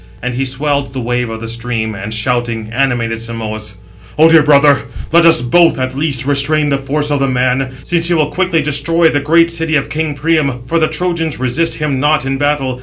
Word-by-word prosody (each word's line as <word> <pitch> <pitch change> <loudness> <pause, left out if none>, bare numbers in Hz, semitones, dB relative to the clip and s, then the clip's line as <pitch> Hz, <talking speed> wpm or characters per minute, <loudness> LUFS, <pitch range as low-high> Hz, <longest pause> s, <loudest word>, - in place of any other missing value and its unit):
And 125 +1 -4
he 135 +2 -2
swelled 140 +1 -2
the 130 - -4
wave 120 0 -2
of 110 0 -7
the 115 - -6
stream, 115 -1 -3
and, 100 +1 -7
shouting, 115 -1 -2
animated 120 -3 -1
Simoïs: 110 -2 -6 0.4
"O 160 +2 +6
dear 165 -1 +6
brother, 145 -1 +3 0.3
let 170 +1 +5
us 165 -7 +5
both, 165 +7 +3
at 130 0 -3
least, 140 -3 0
restrain 145 +1 +1
the 140 - 0
force 145 +2 -1
of 145 - 0
the 135 - +1
man, 130 +1 0
since 170 -1 +1
he 175 - +2
will 150 -2 0
quickly 180 -4 0
destroy 160 +3 +2
the 145 - 0
great 165 +3 +2
city 165 -1 -1
of 140 - -1
king 155 -1 -3
Priam, 140 -4 0
for 165 +6 0
the 155 - +2
Trojans 165 -2 -2
resist 130 +6 -1
him 150 -4 -2
not 150 -1 +1
in 135 0 -2
battle. 140 -3 -1
140 Hz, 210 wpm, -14 LUFS, 125-155 Hz, 0.4 s, O